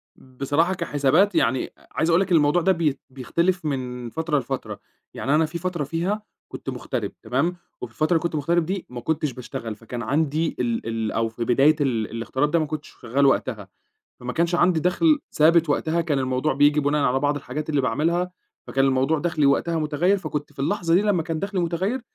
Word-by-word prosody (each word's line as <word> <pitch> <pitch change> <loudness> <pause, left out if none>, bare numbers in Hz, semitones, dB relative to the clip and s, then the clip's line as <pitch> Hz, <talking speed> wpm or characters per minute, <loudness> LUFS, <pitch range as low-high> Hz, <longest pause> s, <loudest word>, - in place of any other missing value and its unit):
بصراحة 145 +7 -1
كحسابات، 170 +3 +2
يعني 130 +3 +2
أ - - -24
عايز 160 +2 0
أقول 170 +3 +4
لك 195 - -2
إن - - +6
الموضوع 150 +4 +3
ده 190 +3 +3
بيت 160 -6 0
بيختلف 170 +7 -1
من 125 -4 -3
فترة 160 0 0
لفترة. 125 -6 -5 0.3
يعني 140 +3 0
أنا 160 +1 +4
في 160 +2 -5
فترة 170 -3 -2
فيها 175 +8 -2 0.3
كنت - - -7
مُغتَرِب - - -4
تمام؟ 160 +8 0 0.3
وفي 125 - -6
الفترة 155 +7 0
اللي 165 - +1
كنت 170 -2 -1
مُغتَرِب 165 +3 +1
دي، 190 +1 -3
ما 125 -1 -7
كنتش 150 +1 -1
باشتغل. 115 -3 -6
فكان 115 +2 -7
عندي 150 +6 0
ال 115 -2 -1
ال 115 -1 -2
أو 115 0 0
في 115 +1 -4
بداية 135 +6 +4
ال 115 -6 0
الاغتراب 130 +5 -1
ده 170 - +3
ما 155 - 0
كنتش 150 0 -6
شغّال 130 +3 +1
وقتها. 115 -6 +1 0.5
فما 125 0 -4
كانش 170 +3 +1
عندي 175 -2 +3
دخل 295 - +3
ثابت. 165 +1 +4
وقتها 160 +3 +1
كان 155 -4 0
الموضوع 130 +3 0
بييجي 145 +2 +4
بناءً 145 +1 +1
على 130 +2 +2
بعض 145 +1 +1
الحاجات 145 +3 -5
اللي 145 -2 +2
باعملها 165 +9 0 0.4
فكان 135 0 +1
الموضوع 135 +4 +2
دخلي 155 -3 +1
وقتها 165 +4 +2
مُتغيّر، 155 +5 +1
فكنت 150 -6 -5
في 140 - -28
اللحظة 165 +3 0
دي 190 - +4
لمّا 200 -5 +2
كان 165 0 -3
دخلي 195 +1 -2
مُتغيّر، 180 +9 -1
150 Hz, 200 wpm, -23 LUFS, 130-170 Hz, 0.5 s, إن